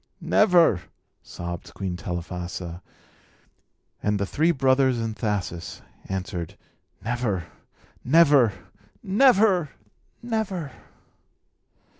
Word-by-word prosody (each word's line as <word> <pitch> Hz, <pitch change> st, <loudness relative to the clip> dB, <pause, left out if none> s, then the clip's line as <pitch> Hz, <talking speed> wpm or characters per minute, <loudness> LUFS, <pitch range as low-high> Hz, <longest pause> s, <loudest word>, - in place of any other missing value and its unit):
"Never!" 175 Hz, -, +4 dB, 0.4 s
sobbed 85 Hz, -1 st, -8 dB
Queen 95 Hz, -2 st, -3 dB
Telephassa; 90 Hz, 0 st, -5 dB, 1.2 s
and 105 Hz, 0 st, +1 dB
the 100 Hz, -, 0 dB
three 155 Hz, -, +1 dB
brothers 130 Hz, -4 st, +3 dB
and 115 Hz, -1 st, -3 dB
Thasus 100 Hz, -6 st, -4 dB, 0.3 s
answered, 90 Hz, -3 st, -4 dB, 0.5 s
"Never! 115 Hz, -7 st, -1 dB, 0.6 s
Never! 145 Hz, -5 st, +5 dB, 0.5 s
Never! 200 Hz, -, +4 dB, 0.5 s
Never!" 200 Hz, -, -2 dB
115 Hz, 75 wpm, -25 LUFS, -, 1.2 s, Never